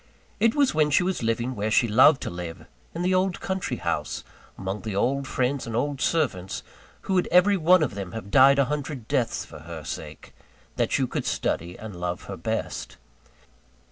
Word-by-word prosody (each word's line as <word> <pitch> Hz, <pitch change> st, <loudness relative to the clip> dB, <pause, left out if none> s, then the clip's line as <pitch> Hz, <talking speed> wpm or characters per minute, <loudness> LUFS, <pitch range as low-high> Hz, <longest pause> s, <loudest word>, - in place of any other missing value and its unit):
It 230 Hz, 0 st, +3 dB
was 285 Hz, -3 st, +3 dB
when 155 Hz, -1 st, +3 dB
she 150 Hz, +5 st, +3 dB
was 185 Hz, -3 st, -1 dB
living 115 Hz, +2 st, -1 dB
where 105 Hz, -2 st, -2 dB
she 120 Hz, +2 st, +3 dB
loved 130 Hz, +7 st, +5 dB
to -, -, -4 dB
live, 85 Hz, -1 st, -7 dB, 0.3 s
in 170 Hz, -, -2 dB
the 185 Hz, +1 st, +2 dB
old 185 Hz, 0 st, +1 dB
country 190 Hz, -1 st, -3 dB
house, -, -, -2 dB, 0.3 s
among 95 Hz, +2 st, -4 dB
the 110 Hz, -3 st, -4 dB
old 135 Hz, +6 st, 0 dB
friends 130 Hz, +1 st, -1 dB
and 115 Hz, -, -4 dB
old 140 Hz, +2 st, -1 dB
servants 115 Hz, -, 0 dB, 0.4 s
who 195 Hz, -, -3 dB
would 180 Hz, -1 st, +2 dB
every 180 Hz, +4 st, +5 dB
one 180 Hz, -1 st, +5 dB
of 140 Hz, -, -1 dB
them 100 Hz, -2 st, -6 dB
have 110 Hz, -3 st, -7 dB
died 135 Hz, +1 st, +7 dB
a 140 Hz, -, +4 dB
hundred 140 Hz, -4 st, -4 dB
deaths 130 Hz, -5 st, 0 dB
for -, -, -11 dB
her 80 Hz, 0 st, -8 dB
sake, -, -, -8 dB, 0.4 s
that -, -, +1 dB
you -, -, +1 dB
could -, -, -3 dB
study 85 Hz, +2 st, -2 dB
and 105 Hz, -3 st, -8 dB
love 90 Hz, 0 st, -4 dB
her 95 Hz, -, -6 dB
best. 110 Hz, +6 st, -4 dB
130 Hz, 195 wpm, -25 LUFS, 100-160 Hz, 0.4 s, died